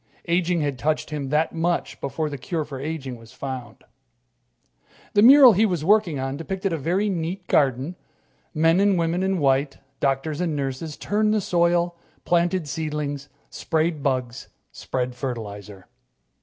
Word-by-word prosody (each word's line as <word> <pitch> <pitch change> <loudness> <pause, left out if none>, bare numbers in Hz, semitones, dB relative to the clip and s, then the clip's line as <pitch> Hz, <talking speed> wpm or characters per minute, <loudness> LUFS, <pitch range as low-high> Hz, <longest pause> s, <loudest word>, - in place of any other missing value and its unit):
Aging 170 0 +1
had 140 -3 -2
touched 155 +2 -1
him 145 -3 -3
that 150 +3 +1
much 170 +1 -2
before 155 +3 -2
the 145 -1 -5
cure 160 +3 -3
for 140 -3 -7
aging 140 -4 -5
was 115 0 -16
found. 130 -4 -7 1.3
The 205 - +4
mural 260 +1 +9
he 205 +3 +3
was 175 -8 0
working 200 -6 +3
on 135 +1 -3
depicted 190 +3 -3
a - - 0
very 180 +8 0
neat 180 0 -3
garden. 140 +3 +1 0.6
Men 165 +2 +3
and 200 -1 +3
women 170 +1 0
in 190 0 0
white, 135 -2 +1 0.2
doctors 140 +3 -1
and 165 -4 -1
nurses, 140 +2 -4
turned 215 +1 +1
the - - +2
soil, 175 -1 +1 0.3
planted 175 -1 +1
seedlings, 150 -2 -4 0.2
sprayed 160 -1 -1
bugs, 130 -3 -2 0.2
spread 125 -1 -3
fertilizer. 105 -6 -6
155 Hz, 150 wpm, -23 LUFS, 135-175 Hz, 1.3 s, mural